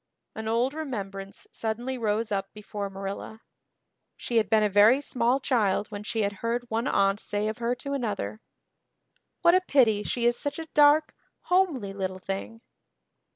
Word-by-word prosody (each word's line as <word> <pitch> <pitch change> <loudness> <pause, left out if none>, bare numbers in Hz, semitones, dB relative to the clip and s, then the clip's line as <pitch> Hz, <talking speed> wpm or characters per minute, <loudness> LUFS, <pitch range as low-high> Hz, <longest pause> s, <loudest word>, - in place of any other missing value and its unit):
An 220 0 -6
old 235 +4 +1
remembrance 200 -10 -6
suddenly 235 +4 -3
rose 220 -2 -1
up 195 -1 -2
before 205 -1 -5
Marilla. 195 +3 -6 0.8
She 235 - -2
had 220 - +2
been 220 -1 +4
a - - +4
very 210 +6 +6
small 255 -2 +1
child 215 -7 +1
when 205 -2 -6
she 220 +1 -1
had 200 0 -1
heard 240 +1 -1
one 230 +4 0
aunt 195 -3 +2
say 210 0 -2
of 215 +1 -4
her 240 +1 0
to 280 +3 -4
another, 220 -4 -3 1.0
"What 340 - +6
a 370 - +5
pity 240 - +3
she 235 +3 -2
is 240 0 +4
such 285 - -3
a 325 - -5
dark, 300 +1 +5 0.3
homely 325 - +1
little 190 -1 -3
thing." 195 +4 -6
225 Hz, 165 wpm, -27 LUFS, 205-255 Hz, 1.0 s, very